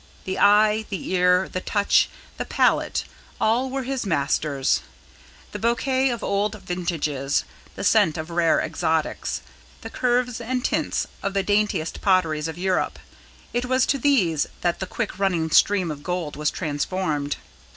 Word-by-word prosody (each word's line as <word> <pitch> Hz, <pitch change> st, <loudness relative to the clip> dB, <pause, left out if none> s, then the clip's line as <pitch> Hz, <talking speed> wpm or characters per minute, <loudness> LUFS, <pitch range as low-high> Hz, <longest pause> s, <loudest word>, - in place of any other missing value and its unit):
The 190 Hz, -, -3 dB
eye, 210 Hz, +1 st, +5 dB
the 195 Hz, -3 st, -4 dB
ear, 180 Hz, 0 st, +3 dB
the 185 Hz, -, -4 dB
touch, 205 Hz, +1 st, +2 dB, 0.3 s
the -, -, -3 dB
palate, -, -, +1 dB, 0.4 s
all 240 Hz, +4 st, +2 dB
were 270 Hz, 0 st, -3 dB
his 265 Hz, 0 st, -2 dB
masters. 145 Hz, -5 st, +1 dB, 0.7 s
The -, -, -5 dB
bouquet 260 Hz, +3 st, +1 dB
of 235 Hz, -2 st, -3 dB
old 205 Hz, +2 st, -1 dB
vintages, 155 Hz, -6 st, -1 dB, 0.3 s
the -, -, -5 dB
scent 155 Hz, -, +4 dB
of 160 Hz, +2 st, -5 dB
rare 170 Hz, -1 st, +3 dB
exotics, 160 Hz, -2 st, -1 dB, 0.4 s
the -, -, -8 dB
curves 245 Hz, -1 st, 0 dB
and 250 Hz, +2 st, -2 dB
tints -, -, 0 dB, 0.2 s
of 200 Hz, 0 st, -3 dB
the 195 Hz, -, +2 dB
daintiest 205 Hz, -5 st, 0 dB
potteries 165 Hz, -6 st, +2 dB
of 160 Hz, 0 st, -6 dB
Europe, 185 Hz, 0 st, 0 dB, 0.6 s
it 245 Hz, +1 st, 0 dB
was 255 Hz, +1 st, +2 dB
to 275 Hz, -, 0 dB
these 200 Hz, -, +2 dB
that 175 Hz, -1 st, 0 dB
the 190 Hz, -, -3 dB
quick -, -, -4 dB
running 175 Hz, -5 st, +1 dB
stream 190 Hz, -3 st, +4 dB
of 145 Hz, -1 st, -7 dB
gold 175 Hz, -2 st, -3 dB
was 150 Hz, 0 st, 0 dB
transformed. 150 Hz, -2 st, -2 dB
185 Hz, 150 wpm, -24 LUFS, 160-220 Hz, 0.7 s, eye